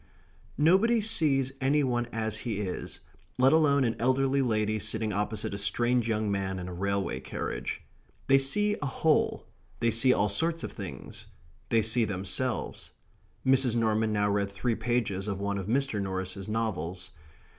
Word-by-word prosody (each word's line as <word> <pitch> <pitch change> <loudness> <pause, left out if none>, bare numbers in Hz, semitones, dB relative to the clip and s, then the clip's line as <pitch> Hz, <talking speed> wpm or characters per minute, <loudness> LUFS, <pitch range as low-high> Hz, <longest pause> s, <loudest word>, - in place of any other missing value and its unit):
Nobody 195 +10 +4
sees 145 - +1
any 145 +2 +3
one 120 -2 0
as 110 -2 -2
he 120 - -4
is, 95 -3 -4 0.4
let 130 +2 +5
alone 145 -3 +4
an 115 -2 0
elderly 135 +2 +2
lady 110 -3 0
sitting 105 +1 0
opposite 105 +1 -2
a 100 - -3
strange 120 +4 +1
young 110 -2 0
man 95 -1 -2
in 90 -1 -5
a 90 - -6
railway 100 -6 -1
carriage. 65 - -5 0.4
They 135 0 +5
see 205 +10 +2
a 145 - -1
whole 155 +3 +1 0.3
they 115 0 +2
see 115 +4 +5
all 105 -4 +2
sorts 165 +12 0
of - - -4
things - - -8 0.4
they 115 -1 +3
see 110 +2 +3
themselves.... 100 +5 -3 0.6
Mrs. 130 -2 +4
Norman 110 -1 +1
now 105 -1 +1
read 100 0 0
three 115 +4 -1
pages 110 -4 -1
of 100 -2 -3
one 100 0 -2
of 95 - -6
Mr. 130 -2 0
Norris's 95 +1 -4
novels. 95 -5 -3
110 Hz, 160 wpm, -28 LUFS, 100-135 Hz, 0.6 s, let